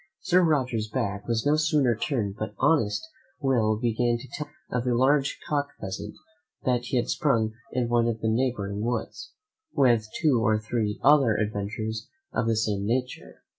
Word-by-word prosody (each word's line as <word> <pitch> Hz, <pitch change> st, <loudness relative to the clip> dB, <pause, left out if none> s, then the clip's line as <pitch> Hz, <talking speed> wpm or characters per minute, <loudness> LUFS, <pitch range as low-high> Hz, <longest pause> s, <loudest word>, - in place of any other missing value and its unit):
Sir 185 Hz, -1 st, +3 dB
Roger's 130 Hz, -10 st, +1 dB
back 100 Hz, -1 st, -3 dB
was 115 Hz, -1 st, 0 dB
no 145 Hz, +1 st, +4 dB
sooner 150 Hz, -6 st, +2 dB
turned 110 Hz, -5 st, -2 dB
but 105 Hz, -, -5 dB
honest 150 Hz, -, +2 dB, 0.3 s
Will 120 Hz, -7 st, +2 dB
began 120 Hz, 0 st, +1 dB
to 115 Hz, -, -11 dB
tell 150 Hz, -, -4 dB
me -, -, -26 dB, 0.2 s
of 125 Hz, 0 st, -1 dB
a 120 Hz, -, +2 dB
large 135 Hz, +3 st, +2 dB
cock 145 Hz, -1 st, 0 dB
pheasant 100 Hz, +2 st, -6 dB, 0.5 s
that 125 Hz, -1 st, +1 dB
he 125 Hz, -, -1 dB
had 120 Hz, -, 0 dB
sprung 115 Hz, -7 st, +1 dB, 0.2 s
in 125 Hz, -2 st, 0 dB
one 120 Hz, 0 st, +2 dB
of 115 Hz, -1 st, -1 dB
the 110 Hz, -, -1 dB
neighbouring 110 Hz, -4 st, 0 dB
woods, 120 Hz, 0 st, -3 dB, 0.4 s
with 120 Hz, -6 st, +3 dB
two 140 Hz, -8 st, +3 dB
or 110 Hz, 0 st, +3 dB
three 110 Hz, -1 st, -2 dB
other 135 Hz, -6 st, +5 dB
adventures 110 Hz, +1 st, -3 dB, 0.2 s
of 115 Hz, -, 0 dB
the 115 Hz, -, +2 dB
same 105 Hz, -3 st, 0 dB
nature. 125 Hz, +4 st, -3 dB
120 Hz, 170 wpm, -26 LUFS, 110-130 Hz, 0.5 s, other